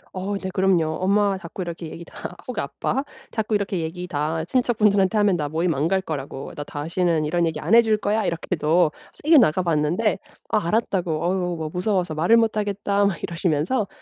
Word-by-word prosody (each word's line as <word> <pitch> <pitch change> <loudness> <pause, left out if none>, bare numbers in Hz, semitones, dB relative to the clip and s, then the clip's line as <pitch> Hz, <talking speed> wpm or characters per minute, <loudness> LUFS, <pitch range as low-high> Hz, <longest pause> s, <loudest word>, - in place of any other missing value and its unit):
어 195 +2 -2
네 190 -1 -5
그럼요. 180 -5 +2
엄마가 200 +1 +2
자꾸 180 +1 -6
이렇게 170 -1 -6
얘기 170 +2 -9
다 180 - -8
혹 245 -4 -3
아빠 270 +4 -2 0.3
자꾸 220 -1 -1
이렇게 200 -2 -1
얘기 170 +2 -4
다 155 0 -1
친척분들한테 210 -3 +2
하면 205 -3 +3
나 150 -3 -2
모임 165 +3 0
안 145 +3 0
갈 190 +2 +1
거라고 140 -5 -6
"나 145 - -5
다시는 160 +2 -1
이런 170 +3 +1
얘기 160 -2 -3
안 165 +7 -1
해 235 - +9
줄거야." 215 -1 +1
이렇게도 165 -1 +1 0.2
세게 310 0 +5
나가봤는데 175 - +2 0.3
아 210 -6 +1
알았다고 180 -6 0
"어유 180 -1 0
뭐 160 -1 -4
무서워서 180 -2 0
말을 170 +9 +4
못 225 -1 +2
하겠다." 205 -1 0
막 195 -5 -1
이러시면서 170 - 0
180 Hz, 390 characters per minute, -23 LUFS, 160-205 Hz, 0.3 s, 해